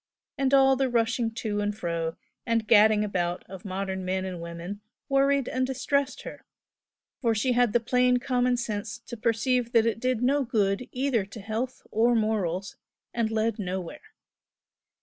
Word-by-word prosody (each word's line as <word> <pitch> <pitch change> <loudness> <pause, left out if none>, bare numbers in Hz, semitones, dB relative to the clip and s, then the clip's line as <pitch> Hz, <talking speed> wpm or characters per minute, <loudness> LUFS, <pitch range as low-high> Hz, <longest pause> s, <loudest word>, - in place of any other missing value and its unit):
and 270 -2 0
all 270 -1 +6
the 265 0 +1
rushing 230 0 +1
to 220 -2 -3
and 205 0 -2
fro 165 -2 -3 0.3
and 230 -1 0
gadding 215 -1 +6
about 175 -4 -2
of 190 -1 -10
modern 190 -1 -3
men 185 +1 -1
and 180 -2 -5
women 170 +4 -7 0.3
worried 275 -1 +2
and 255 0 0
distressed 280 +1 -1
her, - - -9 0.8
for 230 -3 +1
she 250 +4 +1
had 245 -2 +3
the 240 - +3
plain 250 +2 +3
common 250 -1 +1
sense 215 -2 -4
to 240 - -9
perceive 235 +2 0
that 230 -1 +5
it 225 -1 0
did 250 -1 0
no 280 +3 +3
good 215 -2 0
either 255 -4 0
to 200 +3 -10
health 225 +5 -4
or 235 +2 +3
morals, 200 -4 -1 0.4
and 230 -2 0
led 220 0 0
nowhere. 185 -3 -6
225 Hz, 165 wpm, -27 LUFS, 200-250 Hz, 0.8 s, all